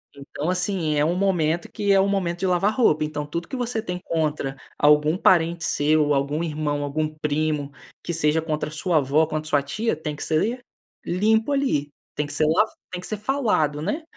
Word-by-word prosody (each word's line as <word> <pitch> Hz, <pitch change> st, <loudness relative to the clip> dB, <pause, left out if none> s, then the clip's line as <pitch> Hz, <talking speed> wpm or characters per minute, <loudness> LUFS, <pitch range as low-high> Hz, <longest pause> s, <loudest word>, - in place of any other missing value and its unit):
então, 140 Hz, +2 st, -6 dB
assim, 180 Hz, -3 st, -1 dB
é 145 Hz, -, +2 dB
um 165 Hz, +3 st, +1 dB
momento 180 Hz, +1 st, 0 dB
que 205 Hz, -3 st, 0 dB
é 195 Hz, -, +5 dB
o 195 Hz, -, +3 dB
momento 180 Hz, -3 st, -1 dB
de -, -, -1 dB
"lavar 180 Hz, +3 st, +2 dB
roupa", 155 Hz, -11 st, +3 dB
então 150 Hz, -1 st, -3 dB
tudo 170 Hz, +3 st, -5 dB
que -, -, -6 dB
você 245 Hz, -3 st, -2 dB
tem 180 Hz, -5 st, -4 dB
contra 150 Hz, -4 st, -1 dB, 0.2 s
algum 150 Hz, +2 st, +4 dB
parente 170 Hz, -3 st, +3 dB
seu, 155 Hz, +1 st, +2 dB
ou 145 Hz, -, +2 dB
algum 145 Hz, +3 st, 0 dB
irmão, 150 Hz, -2 st, -2 dB
algum 155 Hz, +2 st, -1 dB
primo, 150 Hz, -1 st, -1 dB, 0.3 s
que 170 Hz, -, -3 dB
seja 160 Hz, 0 st, +1 dB
contra 155 Hz, -1 st, -2 dB
a -, -, -12 dB
sua 160 Hz, +2 st, 0 dB
avó 145 Hz, +1 st, +3 dB
ou 160 Hz, -, +2 dB
contra 155 Hz, 0 st, -4 dB
sua 145 Hz, -2 st, +2 dB
tia, 215 Hz, +11 st, -1 dB
tem 150 Hz, -1 st, -5 dB
que -, -, -6 dB
ser 225 Hz, +11 st, 0 dB, 0.4 s
limpo 220 Hz, +8 st, +2 dB
ali, 260 Hz, -, 0 dB, 0.3 s
tem 150 Hz, 0 st, -1 dB
que 145 Hz, -, -7 dB
ser, 155 Hz, +1 st, +2 dB
tem 155 Hz, -, +3 dB
que -, -, +4 dB
ser -, -, +1 dB
lava 220 Hz, -, +3 dB, 0.2 s
tem 180 Hz, -1 st, -5 dB
que -, -, -7 dB
ser 215 Hz, -, -3 dB
falado, 210 Hz, -, 0 dB
né. 210 Hz, -, -2 dB
160 Hz, 225 wpm, -23 LUFS, 150-195 Hz, 0.4 s, é